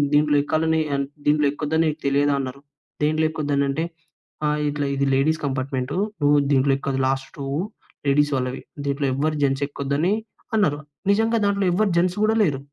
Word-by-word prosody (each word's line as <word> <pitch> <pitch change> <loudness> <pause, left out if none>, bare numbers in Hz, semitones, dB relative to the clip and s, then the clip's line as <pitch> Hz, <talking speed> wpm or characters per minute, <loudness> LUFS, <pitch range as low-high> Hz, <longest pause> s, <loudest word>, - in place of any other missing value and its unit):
దీంట్లో 150 0 +4
ఎక్కాలని 160 +1 +1
అన్ 140 0 0 0.2
దీంట్లో 150 0 +4
ఎక్కొద్దని 155 +2 0
నీకు 155 +1 -5
తెలియదా?" 140 +1 +3
అన్నరు. 135 0 -5 0.4
దేంట్లో 155 +1 +2
ఎక్కొదనంటే? 145 0 0 0.6
ఆహ్, 150 0 0
ఇట్లా 145 -1 -2
"ఇది 140 0 +1
లేడీస్ 155 +4 +1
కంపార్ట్మెంటు, 130 +1 -2 0.3
నువ్వు 145 0 +5
దీంట్లో 135 0 +4
ఎక్కదు, 135 -1 -2
లాస్ట్ 135 0 -1
టువ్వు 140 +2 -2 0.5
లేడీస్ 145 +1 +3
వాళ్ళవి 130 0 -3 0.3
దీంట్లో 140 0 0
ఎవ్వరు 155 +3 0
జెంట్స్ 135 0 +1
ఎక్కొద్దని" 145 +6 0 0.4
అన్నారు. 185 -9 +2 0.3
నిజంగా 225 +3 +2
దాంట్లో 200 -1 +1
ఎవ్వరు 210 +3 +2
జెంట్స్ 180 +2 +2
గూడా 215 +1 +3
లేరు. 145 -8 0
145 Hz, 155 wpm, -23 LUFS, 140-160 Hz, 0.6 s, నువ్వు